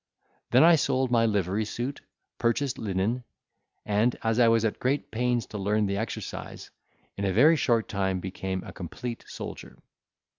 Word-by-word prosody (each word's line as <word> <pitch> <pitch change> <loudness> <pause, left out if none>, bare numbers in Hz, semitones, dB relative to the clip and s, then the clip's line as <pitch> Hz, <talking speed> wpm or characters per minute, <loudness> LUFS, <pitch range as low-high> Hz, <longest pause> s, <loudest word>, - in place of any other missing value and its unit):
Then 125 +4 +6
I 170 0 +7
sold 130 -2 +1
my 115 -1 +4
livery 100 0 0
suit, 120 +6 -4 0.4
purchased 120 +3 0
linen, 105 +5 -1 0.6
and, 105 +4 +1
as 115 +1 +1
I 120 - +6
was 115 0 +3
at 110 - -1
great 135 +3 -1
pains 120 -1 0
to 105 - -3
learn 105 +2 +1
the 100 0 -1
exercise, 110 +1 -6 0.5
in 100 - -3
a 95 - +1
very 145 - +6
short 115 -7 +1
time 95 -2 -1
became 95 0 -4
a - - -9
complete 115 +6 -6
soldier. - - -8
115 Hz, 160 wpm, -27 LUFS, 100-125 Hz, 0.6 s, I